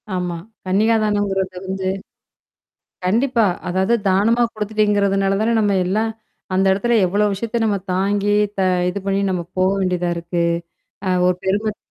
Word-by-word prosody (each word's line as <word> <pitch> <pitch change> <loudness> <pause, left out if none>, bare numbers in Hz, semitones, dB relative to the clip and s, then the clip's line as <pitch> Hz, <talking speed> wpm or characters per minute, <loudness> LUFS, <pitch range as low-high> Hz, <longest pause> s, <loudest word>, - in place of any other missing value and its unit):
ஆமா. 180 -1 -2 0.3
கன்னிகாதானங்கறது 205 -2 +1
வந்து 190 0 -3 1.2
கண்டிப்பா. 230 +4 +2 0.2
அதாவது 190 +5 +1
தானமா 210 +6 +3
குடுத்துட்டீங்கிறதுனால 205 -2 +1
தானே 230 +1 +2
நம்ம 205 -2 +2
எல்லாம் 215 +5 0 0.4
அந்த 190 +1 +2
இடத்துல 235 +5 +1
எவ்ளோ 205 +4 +1
விஷயத்த 230 +4 -2
நம்ம 210 -2 +1 0.2
தாங்கி 205 +2 +1 0.2
த - - +2 0.3
இது 180 - -2
பண்ணி 195 0 +1
நம்ம 180 -2 -1 0.2
போக 185 +1 +3
வேண்டியதா 180 -2 0
இருக்கு? 170 0 -2 0.6
அ - - +1 0.2
ஒரு 180 - +1
பெருமத் 205 +2 0
200 Hz, 130 wpm, -20 LUFS, 185-215 Hz, 1.2 s, தானமா